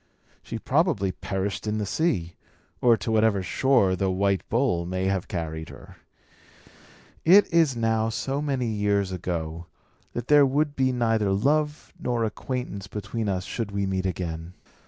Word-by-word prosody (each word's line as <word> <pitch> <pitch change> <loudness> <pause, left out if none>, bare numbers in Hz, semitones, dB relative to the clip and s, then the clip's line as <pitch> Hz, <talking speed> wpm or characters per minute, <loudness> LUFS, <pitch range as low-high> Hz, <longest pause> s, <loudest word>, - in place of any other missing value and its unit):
She 115 - -6
probably 130 - +1
perished 95 +3 -3
in 105 0 0
the 105 - -1
sea; 95 - 0 0.5
or, 120 -2 +5
to 115 - -3
whatever 110 -3 +3
shore 120 -4 +2
the 95 +1 0
white 100 +1 +1
bull 115 -8 +1
may 95 +2 -2
have 95 -1 0
carried 80 -2 -4
her, - - -13 1.3
it 195 +5 +7
is 160 -6 +4
now 110 -1 +1
so 135 +5 -2
many 135 -4 -1
years 105 -3 0
ago, 85 -2 -4 0.5
that 120 - -4
there 150 -1 +7
would 145 +2 +1
be 130 -1 +2
neither 115 -4 +1
love 150 +9 0
nor 120 -2 -1
acquaintance 110 -3 -4
between 105 +2 -4
us 95 -1 -1
should 115 -3 -3
we 100 -1 -1
meet 95 0 -1
again. 85 -2 -4
105 Hz, 155 wpm, -26 LUFS, 95-125 Hz, 1.3 s, it